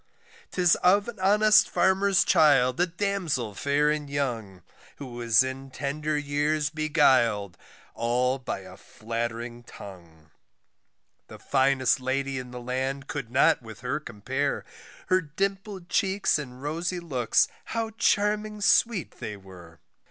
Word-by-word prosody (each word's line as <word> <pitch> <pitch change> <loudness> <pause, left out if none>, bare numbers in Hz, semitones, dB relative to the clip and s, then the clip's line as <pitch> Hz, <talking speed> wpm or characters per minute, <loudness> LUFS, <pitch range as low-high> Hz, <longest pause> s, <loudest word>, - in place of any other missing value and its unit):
'Tis 180 -2 +3
of 200 +4 +3
an 230 -4 -8
honest 210 +3 +5
farmer's 190 +2 +3
child, 135 -4 +4
a 180 - +3
damsel 175 - -2
fair 145 +6 +1
and 150 -2 -3
young, 115 - -3 0.3
Who 130 -4 -9
was 120 -1 +3
in 130 +1 -6
tender 150 +3 -3
years 150 +1 -1
beguil'd 130 - +2 0.4
all 125 +3 0
by 125 -6 -5
a 95 -1 -13
flattering 115 +1 -5
tongue, 85 -9 -13 1.0
The - - -11
finest 135 -1 +2
lady 135 +1 -2
in 125 -1 -8
the 125 0 -8
land 130 +3 -3
could 140 -6 -5
not 130 +1 +3
with 110 -2 -12
her 125 +4 -2
compare, 130 +3 -3 0.4
Her 185 0 +3
dimpled 195 +3 -4
cheeks 190 -3 +1
and 130 -2 -9
rosy 170 +4 -2
looks 130 -9 +1 0.2
how 225 -1 -3
charming 210 -1 0
sweet 205 -2 +2
they 105 -1 -6
were. 90 -5 -15
140 Hz, 130 wpm, -26 LUFS, 120-175 Hz, 1.0 s, honest